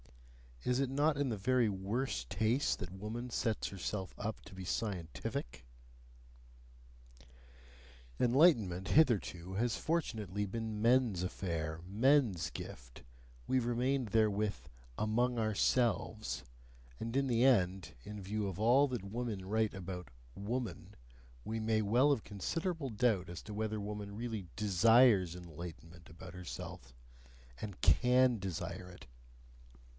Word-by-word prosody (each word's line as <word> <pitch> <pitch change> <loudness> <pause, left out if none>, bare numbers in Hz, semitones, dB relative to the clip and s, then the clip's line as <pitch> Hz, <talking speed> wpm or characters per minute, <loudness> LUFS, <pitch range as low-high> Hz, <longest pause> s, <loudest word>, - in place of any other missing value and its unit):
Is 125 +1 +1
it 135 -2 +1
not 145 +2 +2
in 140 -2 +1
the 110 - -2
very 120 +2 +2
worst 95 - -2
taste 110 +9 +1
that 90 -3 -6
woman 105 +6 -5
thus 120 - -6
sets 110 -2 0
herself 95 0 -4
up 110 +1 -4
to - - -12
be 95 -1 -7
scientific? 80 - -4 2.5
Enlightenment 120 - +4
hitherto 100 - +2
has 115 +2 0
fortunately 110 - -1
been 110 +1 -4
men's 115 -5 +3
affair, 80 -4 -3
men's 110 - +3
gift 60 -1 -9 0.4
we 130 - +3
remained 125 +2 0
therewith 105 -1 +2 0.4
"among 120 +3 +1
ourselves"; 110 0 +1 0.6
and 115 +2 -4
in 135 0 +2
the 120 -1 +2
end, 95 -8 +3
in 105 +4 -7
view 105 +2 -2
of 95 -1 -5
all 125 +6 +5
that 125 -7 -4
women 105 -1 -4
write 110 +2 +1
about 90 -3 -6 0.3
"woman," 100 -3 -4 0.5
we 110 +1 -3
may 110 0 +1
well 120 +8 +4
have 125 -7 +1
considerable 160 - -3
doubt 105 -5 +1
as 85 -2 -6
to 105 - -8
whether 110 0 -2
woman 100 0 -5
really 110 -4 -4
DESIRES 105 -2 +5
enlightenment 85 0 -10
about 85 +2 -11
herself 75 -8 -8 0.7
and 100 -4 -7
CAN 125 0 +5
desire 90 0 -5
it. 90 - -13
105 Hz, 125 wpm, -34 LUFS, 95-120 Hz, 2.5 s, all